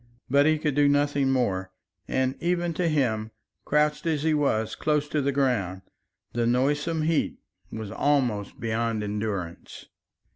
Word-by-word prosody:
But 140 +2 +5
he 155 0 +3
could 150 -1 -1
do 145 +1 +4
nothing 145 -1 +2
more, 95 -8 0 0.4
and 130 0 0
even 175 0 0
to 175 +1 0
him, 120 -8 0 0.4
crouched 150 +2 +1
as 155 -3 0
he 160 -1 +2
was 125 -7 +1
close 150 -1 0
to 150 - 0
the 140 +1 +1
ground, 110 -10 0 0.5
the 120 -1 +1
noisome 145 +6 +1
heat 160 0 0 0.3
was 110 -2 -6
almost 125 -8 0
beyond 115 -1 -1
endurance. 100 -5 -4
135 Hz, 145 wpm, -26 LUFS, 110-150 Hz, 0.5 s, But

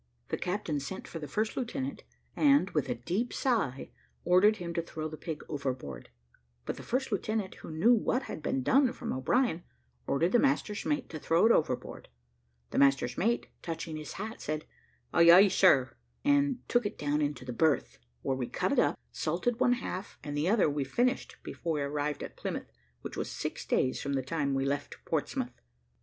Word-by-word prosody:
The - - -1
captain 180 -5 -1
sent 140 +7 -6
for 165 - -6
the 150 - -6
first 215 +5 -1
lieutenant, 265 +2 -3 0.3
and, 280 -9 +4
with 150 -3 0
a 125 - 0
deep 180 - -2
sigh, 210 - 0 0.3
ordered 195 +5 +5
him 170 -3 -5
to 170 - 0
throw 160 -1 -5
the 155 - -7
pig 155 -1 -6
overboard; 130 - -4 0.6
but - - -2
the - - -7
first 255 +1 -1
lieutenant, 210 0 -1
who - - -9
knew 165 +10 +4
what 245 +3 +1
had - - -6
been 135 -3 -1
done 260 - +4
from - - -4
O'Brien, 175 - +1 0.4
ordered 165 +6 +2
the 240 - +5
master's 270 -7 +1
mate 295 -3 0
to 155 - -6
throw 165 +6 +3
it 230 - +6
overboard; 150 - 0 0.6
the - - +1
master's 135 -3 +3
mate, 230 +6 +1 0.2
touching 165 -1 -5
his 155 -2 -6
hat 220 +3 -6
said, 155 +1 -3 0.5
"Ay, 170 0 +6
ay, 190 +4 +9
sir," 140 -10 +4 0.3
and 285 -3 +2
took 240 0 +2
it 205 - -4
down 150 +1 0
into 145 -3 -2
the 125 - -4
berth, 135 - +1 0.2
where 135 - 0
we 125 -2 -3
cut - - -1
it - - +3
up, - - +2
salted 180 - -1
one 250 -1 +4
half, 200 -6 -5
and 145 -1 -4
the 150 +5 +1
other 210 -4 +4
we 145 -1 0
finished 245 - 0
before 165 -1 -3
we 150 - -1
arrived 145 +1 -2
at - - -8
Plymouth, - - -5 0.3
which - - -7
was - - -3
six - - -5
days 130 - +1
from 140 - -2
the 135 -1 0
time 140 -1 -1
we 135 0 0
left 140 +1 -2
Portsmouth. - - -2
165 Hz, 195 wpm, -30 LUFS, 145-225 Hz, 0.6 s, ay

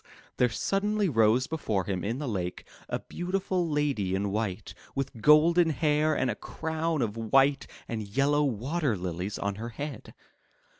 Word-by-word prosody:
'* - - -29
there 125 - +4
suddenly 200 - 0
rose 115 -2 +3
before 115 -12 -1
him 95 -2 -3
in 115 +4 -2
the 145 0 -4
lake 90 -6 -3 0.2
a - - 0
beautiful 180 -1 -2
lady 140 -11 0
in 100 +1 -1
white, 105 -1 -3 0.2
with 135 -4 -3
golden 165 +5 +6
hair 150 +1 +2
and 130 -2 +1
a - - -4
crown 160 -2 -2
of 105 -2 -3
white 135 +5 +3 0.2
and 110 -3 -4
yellow 140 +7 +2
water 135 - 0
lilies 90 +3 -4
on 100 0 -2
her 115 - -4
head. 145 +5 -7
135 Hz, 160 wpm, -28 LUFS, 105-155 Hz, 0.2 s, golden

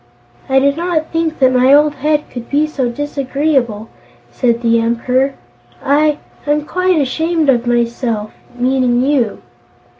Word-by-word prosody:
"I 265 - +3
did 280 +2 +2
not 335 -2 -2
think 325 -1 -1
that 260 -1 +3
my 255 +1 +4
old 295 +1 +5
Head 300 +1 -1
could 240 -1 -8
be 295 +2 +2
so 275 -5 -2
disagreeable," 270 -4 -2 0.4
said 235 -2 0
the 230 0 +3
Emperor. 250 +4 0 0.4
"I 300 +2 +2 0.3
I'm 295 0 0
quite 365 0 +1
ashamed 320 +3 0
of 240 -2 +2
myself; 235 -2 -1 0.2
meaning 250 -1 +1
you." 265 -6 0
270 Hz, 140 wpm, -15 LUFS, 240-300 Hz, 0.4 s, old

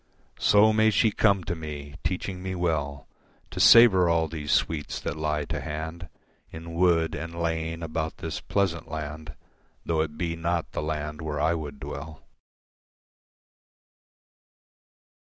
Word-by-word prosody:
So 105 +1 +5
may 110 0 +4
she 110 +1 +3
come 100 -3 +2
to 85 - -3
me, 75 -3 -7
teaching 90 0 -3
me 95 0 -4
well 75 -6 -2 0.5
To - - -6
savour 100 -7 +7
all 85 -1 +2
these 75 -2 -4
sweets 75 -3 0
that - - -4
lie 75 -1 -1
to - - -4
hand 80 +3 -6 0.4
In 85 +1 -8
wood 85 -2 +2
and 85 +2 -6
lane 80 0 -2
about 80 0 -3
this 80 +1 -4
pleasant 85 -6 -1
land 75 -1 -6 0.5
Though 80 -1 +1
it 75 -1 -4
be 85 -2 -2
not 85 0 -2
the - - -3
land 75 0 -4
where 75 -2 -3
I 80 +3 +2
would 75 -4 -5
dwell. 75 +2 -8
80 Hz, 140 wpm, -26 LUFS, 75-85 Hz, 0.5 s, savour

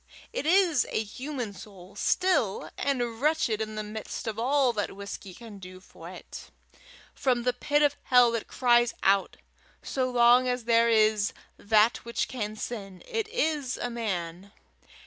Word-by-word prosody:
It 445 - -3
is 350 -5 +3
a 220 - -1
human 250 0 -6
soul 195 0 -13
still, 355 - 0
and 245 -4 -2
wretched 295 -8 +1
in 215 0 -4
the 215 - -3
midst 215 +1 -6
of 220 -1 -4
all 260 +1 +2
that 205 -3 -3
whisky 200 -1 -8
can 215 +1 -11
do 185 0 -11
for 185 - -13
it. - - -10 0.6
From 250 -3 0
the 250 0 +1
pit 290 +4 +1
of 290 -1 +3
hell 245 -2 +5
it 230 - -3
cries 240 -1 +2
out. 195 0 +2 0.5
So 260 -1 -1
long 245 +1 +5
as 250 -1 -1
there 230 0 +3
is 215 -2 +3 0.2
that 215 +2 +3
which 235 0 -3
can 215 -4 -4
sin, 200 -5 -7
it 450 -3 -2
is 310 - -1
a 245 - -3
man. 190 -5 -4
235 Hz, 160 wpm, -27 LUFS, 210-255 Hz, 0.6 s, hell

